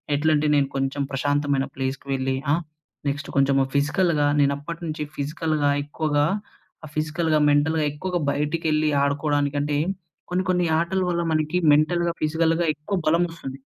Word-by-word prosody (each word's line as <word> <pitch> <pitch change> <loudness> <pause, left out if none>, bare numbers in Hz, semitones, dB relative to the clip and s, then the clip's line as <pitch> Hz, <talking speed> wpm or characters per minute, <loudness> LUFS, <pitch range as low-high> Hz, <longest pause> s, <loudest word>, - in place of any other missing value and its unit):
ఎట్లంటే 150 0 +2
నేను 140 -1 +3
కొంచెం 135 +1 -1
ప్రశాంతమైన 145 0 0
ప్లేస్‌కి 135 +1 -4
వెళ్ళి. 130 0 -1 0.2
ఆ? - - +5 0.5
నెక్స్ట్ 140 0 -3
కొంచెం 140 0 +3 0.2
ఫిజికల్‌గా 150 +1 +2
నేనప్పటి 145 +4 0
నుంచి 155 -1 -3
ఫిజికల్‌గా 150 0 -1
ఎక్కువగా 145 0 0 0.7
ఫిజికల్‌గా, 155 +1 0
మెంటల్‌గా 155 +2 +2
ఎక్కువగా 180 +4 -3
బయటకెళ్ళి 155 +1 0
ఆడుకోవడానికంటే, 145 0 0 0.5
కొన్ని 180 +1 0
కొన్ని 180 -1 +2
ఆటల 180 +3 0
వల్ల 170 -1 0
మనకి 155 +2 0 0.2
మెంటల్‌గా, 170 +3 +2
ఫిజికల్‌గా 165 +2 +1
ఎక్కువ 150 +7 -4
బలమోస్తుంది. 165 -5 -1
150 Hz, 120 wpm, -24 LUFS, 145-165 Hz, 0.7 s, ఆ